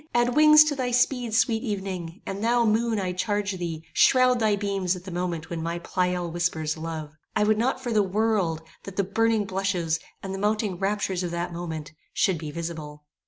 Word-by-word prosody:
Add 240 +1 +2
wings 305 0 +8
to 305 -1 -1
thy 255 -2 -1
speed, 245 -2 +1
sweet 225 -1 +2
evening; 190 -7 -4
and 195 +2 -4
thou, 235 +1 +3
moon, 225 0 +2
I 185 -2 -1
charge 205 +1 -1
thee, 165 -2 -4
shroud 255 -1 +5
thy 215 -2 +3
beams 195 -3 -1
at 180 - -9
the 190 - -8
moment 175 -2 -3
when 165 -1 -3
my 170 +1 -2
Pleyel 180 0 -1
whispers 160 -2 -1
love. 160 -2 -6 0.2
I 215 - +3
would 215 0 +3
not 255 +3 +1
for 245 -3 -3
the 215 - +4
world, 195 -5 0 0.2
that 195 - -8
the 200 - +1
burning 220 +2 +1
blushes, 185 -4 -1 0.2
and 195 -1 -4
the 195 - -4
mounting 210 -3 0
raptures 195 -2 -1
of 175 - -2
that 170 0 -3
moment, 160 -3 -6 0.2
should 185 -4 +2
be 155 -1 -5
visible. 155 -2 -6
195 Hz, 200 wpm, -26 LUFS, 170-220 Hz, 0.2 s, wings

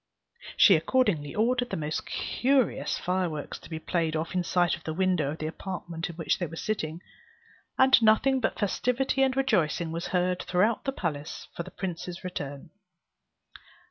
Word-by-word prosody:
She 195 - +8
accordingly 165 - +1
ordered 245 +3 +1
the - - -2
most 155 0 -3
curious 265 0 +1
fireworks 175 -5 -2
to - - -14
be 160 - -4
played 160 -1 -1
off 160 +3 -2
in 180 -1 +1
sight 175 0 +2
of 170 - -15
the 160 - -4
window 180 -5 +1
of 155 - -4
the 155 - -4
apartment 170 0 -5
in 170 - -8
which 165 -1 0
they 175 - -1
were 165 - -9
sitting; 165 -4 -3 0.8
and 265 -1 +6
nothing 235 +5 +4
but 245 - -1
festivity 250 +6 0
and 265 -1 +2
rejoicing 170 - +1
was 170 +1 -3
heard 180 0 0
throughout 205 +5 +1
the 270 - +1
palace 155 - -4
for - - -3
the - - -7
prince's 180 -1 -5
return. 145 -4 -6
180 Hz, 170 wpm, -28 LUFS, 160-220 Hz, 0.8 s, She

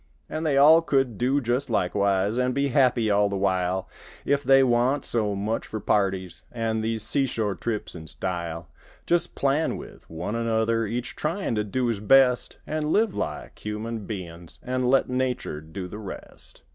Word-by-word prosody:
An' 155 - -4
they 150 -4 +1
all 155 +4 +7
could 135 -8 0
do 130 +4 +2
just 125 +1 -1
likewise 100 0 +1
An' 125 0 +1
be 140 +1 0
happy 125 -5 +3
all 100 0 +3
the 100 - -2
while, 95 -1 0 0.4
If 140 0 +1
they 135 -1 +6
wa'n't 125 +3 +2
so 105 -3 0
much 105 +3 -2
for 110 - -5
parties 95 -3 0
An' 115 -2 -1
these 110 -1 -2
seashore 115 -6 0
trips—an' 95 -6 -5
style. 85 -3 -4 0.4
Just 175 0 +1
plan 140 +3 +1
with - - -12
one 85 +6 -4
another 115 -1 0
Each 120 +3 -4
tryin' 165 0 -2
to 105 -1 0
do 125 +5 -1
his 115 -4 -1
best; 125 +3 +4
An' 155 0 -2
live 215 0 +2
like - - -5
human 105 0 -4
bein's 85 -5 -8
An' 130 0 -2
let 130 +2 +3
nature 125 -11 -2
do 80 +4 -7
the 105 +4 -8
rest. 100 -3 -10
115 Hz, 170 wpm, -25 LUFS, 100-135 Hz, 0.4 s, all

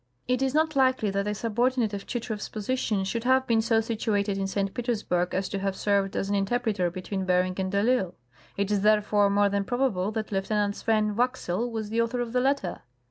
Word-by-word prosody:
It 250 +1 +1
is 270 +1 0
not 315 0 +2
likely 260 -6 +2
that 200 +1 -1
a 210 - -1
subordinate 235 +1 0
of 200 - -5
Chitrow's 220 -3 -4
position 215 -2 -1
should 225 +4 -2
have 260 +1 +3
been 230 -2 +3
so 225 0 +2
situated 215 -3 -1
in 195 0 -1
St. 195 0 -2
Petersburg 215 -8 -1
as 190 +1 0
to 200 - -3
have 195 0 -1
served 200 -1 0
as 195 - -1
an 200 - -1
interpreter 200 -2 0
between 185 +2 -4
Bering 185 0 +2
and 190 0 -1
de 200 - 0
I'Isle. 215 -6 +1 0.4
It 200 +1 0
is 205 -2 +2
therefore 210 -1 +3
more 200 0 +3
than 200 0 0
probable 215 -5 0
that 215 -1 -3
Lieutenant 205 +1 0
Swen 215 -2 +1
Waxel 245 -3 0
was 220 -2 -4
the 230 +1 +2
author 230 +2 -1
of 240 -1 -3
the 250 - +2
letter. 270 -8 0
210 Hz, 210 wpm, -27 LUFS, 195-240 Hz, 0.4 s, have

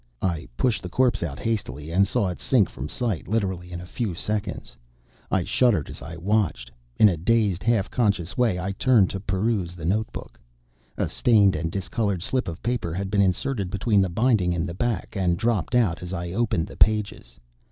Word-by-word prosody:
I 85 -4 -1
pushed 120 -4 +1
the 90 - -6
corpse 125 +1 +2
out 80 -5 -3
hastily, 100 -9 -3
and 100 +3 +3
saw 100 -1 +1
it 90 - -6
sink 115 -8 +2
from 65 +5 -6
sight 115 -9 -2
literally 95 -5 -2
in 85 - -5
a 90 - -8
few 100 -1 -3
seconds. 105 +1 -3 0.5
I 95 - +1
shuddered 105 - +2
as - - -10
I 80 +1 -8
watched. 95 - 0 0.3
In 110 - +7
a 95 - +2
dazed, 100 0 +1
half 110 -2 +1
conscious 100 -6 0
way 115 -7 +2
I 95 +2 -2
turned 105 -1 +3
to 95 - -4
peruse 95 -2 -1
the 85 -3 -7
notebook. 105 +6 -3 0.6
A - - 0
stained 105 -5 +3
and 80 +1 -2
discolored 100 -1 -2
slip 130 -3 -1
of 85 -2 -6
paper 115 -9 -2
had 95 +1 -3
been 100 -1 +3
inserted 100 +2 0
between 100 +2 +2
the 95 - +1
binding 100 -3 +2
and 85 +2 -1
the 85 - -5
back, 110 +1 -2
and 90 -3 +1
dropped 115 +1 0
out 105 -9 +2
as 90 +1 -6
I 85 -1 -4
opened 110 -4 0
the - - -12
pages. 105 - +1
95 Hz, 195 wpm, -24 LUFS, 90-110 Hz, 0.6 s, In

